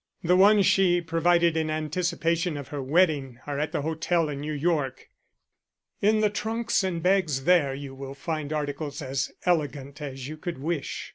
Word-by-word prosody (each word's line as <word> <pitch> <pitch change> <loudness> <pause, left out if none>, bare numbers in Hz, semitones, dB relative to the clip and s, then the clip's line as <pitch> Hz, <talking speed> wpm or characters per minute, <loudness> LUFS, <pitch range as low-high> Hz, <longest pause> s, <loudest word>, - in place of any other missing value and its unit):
"The 180 +2 +4
ones 200 +1 +6
she 180 -2 +4
provided 170 0 +2
in 160 -1 0
anticipation 165 +1 -1
of 140 - -7
her 145 -2 -4
wedding 140 -3 +1
are 145 -1 -3
at 150 - -1
the 145 - -2
hotel 160 +1 0
in 140 -1 -4
New 150 +1 -4
York. 145 -3 -1 0.9
In 215 +1 +3
the 210 - +3
trunks 225 +1 -1
and 175 -3 -2
bags 180 -8 +2
there 160 -6 +3
you 140 -1 -7
will 135 0 -8
find 155 0 -4
articles 145 0 -3
as 130 0 -2
elegant 145 -4 -1
as 135 -3 -6
you 155 +1 -7
could 175 0 -5
wish." 155 +2 -3
155 Hz, 170 wpm, -26 LUFS, 140-175 Hz, 0.9 s, ones